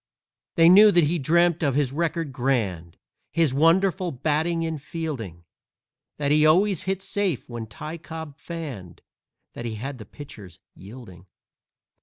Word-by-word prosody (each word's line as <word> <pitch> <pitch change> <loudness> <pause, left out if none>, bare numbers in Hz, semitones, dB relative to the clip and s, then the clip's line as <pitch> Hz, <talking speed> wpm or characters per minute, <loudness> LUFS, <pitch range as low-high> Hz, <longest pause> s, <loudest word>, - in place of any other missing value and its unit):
They 165 -1 +6
knew 205 +5 +8
that 175 -4 +4
he 165 +3 +1
dreamed 170 +4 +2
of 140 -5 +1
his 140 -3 +1
record 165 -1 -2
grand, 110 -11 -2 0.3
His 165 -5 +1
wonderful 175 +4 +2
batting 160 +4 -1
and 160 -3 -4
fielding, 140 - -6 0.7
That 145 -1 -1
he 150 0 +4
always 185 +5 +4
hit 190 0 -2
safe 195 - -2
when 120 -2 -7
Ty 155 +9 -8
Cobb 160 -2 -9
fanned, 150 - -8 0.5
That 120 - -7
he 115 -2 -4
had 130 +4 -6
the 110 - -9
pitchers 105 -7 -12
yielding. 95 -3 -13
150 Hz, 145 wpm, -24 LUFS, 125-170 Hz, 0.7 s, knew